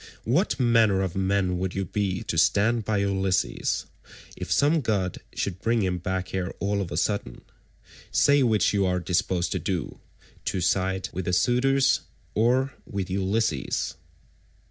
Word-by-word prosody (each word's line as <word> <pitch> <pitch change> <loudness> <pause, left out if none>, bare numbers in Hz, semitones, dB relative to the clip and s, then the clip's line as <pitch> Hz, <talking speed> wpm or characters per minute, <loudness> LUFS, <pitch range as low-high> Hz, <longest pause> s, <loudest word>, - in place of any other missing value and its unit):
What 145 - +1
manner 115 -6 +4
of 95 -3 -3
men 95 -1 +1
would 95 0 -3
you 95 0 -1
be 95 +1 -2
to - - -3
stand 105 +8 +3
by 110 -1 0
Ulysses, 95 -2 0 0.5
if - - -6
some 150 +3 +3
god 100 -7 -1 0.2
should 95 -1 -3
bring 115 -1 +1
him 90 -1 -1
back 95 +1 -3
here 95 -1 -2
all 100 0 -1
of 90 -3 -5
a - - -3
sudden? 105 -1 -1 0.7
Say 140 +7 +4
which 110 -5 +3
you 100 -1 +2
are 90 0 +1
disposed 90 0 0
to - - -1
do—to 95 0 -5
side 95 +1 0
with 95 0 -4
the 90 - -1
suitors, 135 +6 +3 0.3
or 130 +4 +2
with 95 -3 -4
Ulysses?" 95 -5 -1
100 Hz, 150 wpm, -26 LUFS, 95-115 Hz, 0.7 s, manner